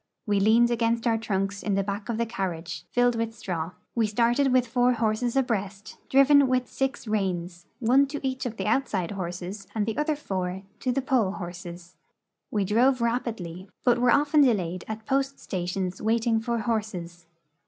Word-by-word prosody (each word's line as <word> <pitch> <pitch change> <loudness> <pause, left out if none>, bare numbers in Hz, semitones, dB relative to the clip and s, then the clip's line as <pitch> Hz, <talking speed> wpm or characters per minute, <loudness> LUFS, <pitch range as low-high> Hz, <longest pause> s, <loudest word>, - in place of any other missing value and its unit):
We 205 -2 +2
leaned 230 +4 +4
against 230 0 +1
our 225 -1 +2
trunks 195 -2 -2
in 205 -2 0
the 195 - +1
back 200 +3 -4
of 230 - -1
the 235 - +1
carriage, 170 -6 -4
filled 245 0 +3
with 225 0 -2
straw. 175 -4 -4 0.2
We 230 -2 +2
started 240 +5 +2
with 255 -1 +4
four 245 +1 +2
horses 230 +1 0
abreast, 210 -6 -2
dilven 275 +1 +6
with 255 -1 +1
six 270 -3 -3
reins, 180 -4 -2
one 260 +4 +4
to 280 -1 -3
each 260 0 -2
of 225 -2 -7
the 190 - -3
outside 210 -6 0
horses 185 +1 -5
and 210 -2 +1
the 225 +5 -2
other 300 0 +1
four 190 -8 -4 0.2
to 255 - 0
the 270 +1 -1
pole 235 -8 +2
horses. 175 -1 -8 0.5
We 205 -2 0
drove 250 +6 +3
rapidly, 220 -7 -3
but 245 -1 +3
were 245 0 +3
often 290 +3 +4
delayed 185 -9 +1
at 220 0 -6
post 275 0 0
stations 185 0 -3
waiting 225 +1 +2
for 235 +1 -1
horses. 185 -7 -3
220 Hz, 175 wpm, -26 LUFS, 190-245 Hz, 0.5 s, dilven